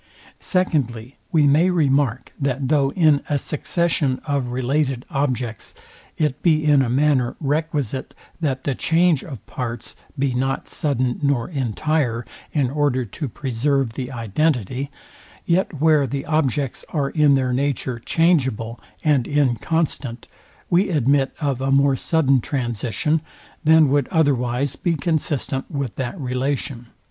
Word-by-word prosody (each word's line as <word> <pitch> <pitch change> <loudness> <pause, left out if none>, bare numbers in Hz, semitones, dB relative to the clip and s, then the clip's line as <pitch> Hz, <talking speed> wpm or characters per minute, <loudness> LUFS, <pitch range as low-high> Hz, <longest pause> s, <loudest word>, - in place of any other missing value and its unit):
Secondly, 135 - -1
We 155 -3 +4
may 155 +6 +4
remark, 140 - +1
that 135 -1 -1
though 140 -3 +3
in 155 -5 +4
a 145 - +2
succession 150 -2 0
of 140 -4 -1
related 130 +1 -1
objects, 125 -5 -2 0.4
it 150 -4 0
be 155 -3 +3
in 145 -2 +5
a 125 - 0
manner 130 -1 +2
requisite, 145 -4 -2 0.2
that 135 -5 -1
the 140 - 0
change 165 +1 +2
of 130 - -9
parts 120 -2 -5 0.2
be 135 -1 0
not 135 +2 -1
sudden 130 -5 -1
nor 140 -5 +1
entire, 130 - -1 0.3
in 135 -5 +1
order 140 -4 +1
to 140 - -5
preserve 130 0 -1
the 130 +2 -5
identity, 125 - -1 0.6
yet 170 -3 0
where 155 -3 +4
the 135 +3 -4
objects 145 -4 0
are 140 -4 -1
in 150 -3 +4
their 130 -2 +1
nature 130 -2 -1
changeable 125 -7 +1 0.2
and 145 -6 +2
inconstant, 145 -2 -1 0.4
we 185 +4 +2
admit 140 -3 +2
of 140 -5 -1
a 135 - 0
more 140 0 +4
sudden 135 -3 +2
transition, 125 +4 -1 0.4
than 160 -1 +6
would 140 -1 +2
otherwise 135 -3 +1
be 175 -2 0
consistent 145 -3 -1
with 140 - -3
that 130 +7 -4
relation. 130 -1 -2
140 Hz, 135 wpm, -22 LUFS, 125-150 Hz, 0.6 s, than